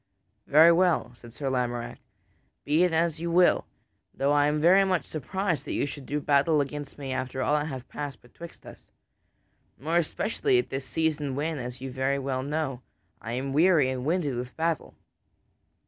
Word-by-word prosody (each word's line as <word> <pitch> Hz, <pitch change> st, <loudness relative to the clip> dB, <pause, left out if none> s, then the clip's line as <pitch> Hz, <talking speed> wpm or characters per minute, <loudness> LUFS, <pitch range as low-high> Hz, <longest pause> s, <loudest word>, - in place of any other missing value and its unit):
"Very 160 Hz, +4 st, +7 dB
well," 170 Hz, -7 st, +2 dB
said 120 Hz, -1 st, -14 dB
Sir 140 Hz, +4 st, -5 dB
Lamorack, 120 Hz, -2 st, -2 dB
"so -, -, -37 dB, 0.6 s
be 155 Hz, +4 st, +3 dB
it 180 Hz, -, +2 dB
as 165 Hz, -1 st, +1 dB
you 170 Hz, +1 st, -3 dB
will, 175 Hz, +1 st, +3 dB, 0.5 s
though 140 Hz, +1 st, +1 dB
I 145 Hz, 0 st, +4 dB
am 150 Hz, +1 st, 0 dB
very 180 Hz, +5 st, +6 dB
much 185 Hz, -3 st, 0 dB
surprised 165 Hz, 0 st, -2 dB
that -, -, -4 dB
you -, -, +1 dB
should 140 Hz, -2 st, -8 dB
do 150 Hz, -, -1 dB
battle 145 Hz, +2 st, +3 dB
against 145 Hz, 0 st, -4 dB
me, 135 Hz, -2 st, -5 dB
after 130 Hz, 0 st, -3 dB
all 145 Hz, -, +1 dB
that 150 Hz, 0 st, +1 dB
hath 130 Hz, -4 st, -7 dB
passed 145 Hz, -3 st, -6 dB
betwixt 165 Hz, +7 st, -13 dB
us. -, -, -13 dB, 0.9 s
More 160 Hz, +5 st, -1 dB
especially 225 Hz, -, 0 dB
at 370 Hz, -, -1 dB
this 135 Hz, 0 st, -4 dB
season 150 Hz, +1 st, -1 dB
when, 150 Hz, +1 st, -2 dB
as 125 Hz, 0 st, -7 dB
you 135 Hz, 0 st, -5 dB
very 135 Hz, +2 st, 0 dB
well 135 Hz, -1 st, -2 dB
know, 140 Hz, -2 st, -3 dB, 0.4 s
I 115 Hz, -, -5 dB
am 135 Hz, +2 st, -3 dB
weary 155 Hz, -4 st, +4 dB
and 130 Hz, -1 st, -4 dB
winded 155 Hz, -3 st, 0 dB
with 125 Hz, +1 st, -6 dB
battle." 165 Hz, -1 st, -2 dB
145 Hz, 185 wpm, -27 LUFS, 130-165 Hz, 0.9 s, Very